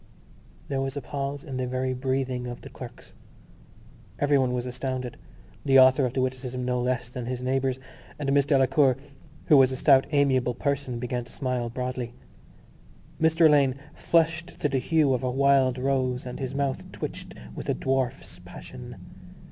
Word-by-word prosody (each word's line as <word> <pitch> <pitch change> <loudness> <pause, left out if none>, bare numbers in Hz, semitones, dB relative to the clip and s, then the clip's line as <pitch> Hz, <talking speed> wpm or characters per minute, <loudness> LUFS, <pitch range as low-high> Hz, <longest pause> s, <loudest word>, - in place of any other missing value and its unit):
There 135 -1 -1
was 135 +1 -3
a - - -3
pause 140 +2 -4
in 135 -4 -6
the 130 -1 -1
very 130 +1 -1
breathing 130 -1 -2
of 120 0 -7
the - - -11
clerks. - - -11 1.0
Everyone 140 -3 +2
was 125 0 -2
astounded 125 -1 -4 0.5
(the 135 -1 +5
author 130 +1 +6
of 120 - -6
the 130 - +1
witticism 130 -1 -3
no 125 0 0
less 125 -1 -2
than 125 -2 -5
his 125 0 -3
neighbours) 130 0 0 0.4
and 140 -2 -1
Miss 140 -1 +3
Delacour, 135 -1 +3 0.5
who 150 - +6
was 135 -1 +6
a - - -2
stout 135 -1 +5
amiable 130 -4 +2
person, 140 -3 -2
began 125 0 -3
to - - -16
smile 125 -4 -2
broadly. 125 0 -4 1.1
Mr 160 +1 +4
Alleyne 140 -4 +5 0.2
flushed 165 +1 0
to - - +1
the 135 -2 0
hue 150 +1 +2
of 125 - 0
a 125 - 0
wild 135 -1 +3
rose 130 -1 0
and 125 - -6
his 135 -1 -4
mouth 140 -1 -2
twitched - - -7 0.2
with - - -7
a - - +2
dwarf's 130 -7 -2
passion. 90 0 -10
130 Hz, 170 wpm, -26 LUFS, 125-140 Hz, 1.1 s, author